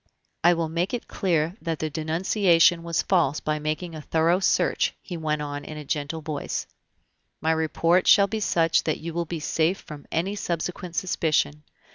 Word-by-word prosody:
"I 175 +1 +6
will 165 -1 -1
make 175 +7 -1
it 240 - -7
clear 170 -3 0
that 165 -2 -2
the 155 +1 -3
denunciation 170 +2 +3
was 165 -1 -1
false 165 -6 +2
by 155 0 -2
making 155 +3 -3
a 155 - -7
thorough 165 +4 +2
search," 195 - +1
he 180 - -8
went 155 -2 -1
on 145 0 -5
in 155 +1 -8
a 150 - -7
gentle 145 +2 -3
voice; 150 -2 -4 0.7
"my 160 +2 +1
report 165 +3 +2
shall 200 - +7
be 220 +2 -3
such 165 -5 +2
that 155 - 0
you 165 +1 -6
will 170 +1 -1
be 165 0 -5
safe 160 +4 +1
from 150 -4 -11
any 185 +5 -1
subsequent 175 -1 -4
suspicion. 155 -5 0
165 Hz, 180 wpm, -25 LUFS, 155-175 Hz, 0.7 s, shall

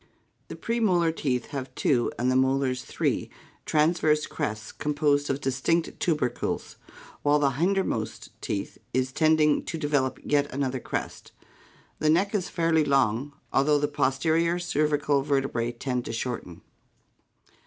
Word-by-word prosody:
The - - -7
premolar 190 -8 +1
teeth 125 -6 -1
have 135 -3 -5
two 120 -4 +1
and 125 +2 +1
the - - +1
molars 130 -1 +1
three - - -1 0.4
transverse 155 -1 +2
crests 110 -8 -4
composed 145 -1 0
of 135 0 0
distinct 135 +6 0
tubercles, 150 -8 -1 0.4
while 145 0 +3
the 140 -2 +2
hinder 185 +8 +1
most 110 - -4
tooth 100 - -4 0.2
is 130 0 +1
tending 155 +1 +3
to 165 - -4
develop 145 -4 0
yet 145 -1 +1
another 130 -1 -1
crest. - - -5 0.7
The 155 - +2
neck 190 +6 +3
is 190 -4 -1
fairly 165 -2 +2
long, 135 -1 +1 0.2
al 135 - +4
though 150 +1 +3
the 145 0 +1
posterior 160 +5 +1
cervical 150 -4 +1
vertebrae 135 -4 0
tend 125 0 -3
to - - -4
shorten. 115 -7 -5
145 Hz, 140 wpm, -26 LUFS, 130-155 Hz, 0.7 s, al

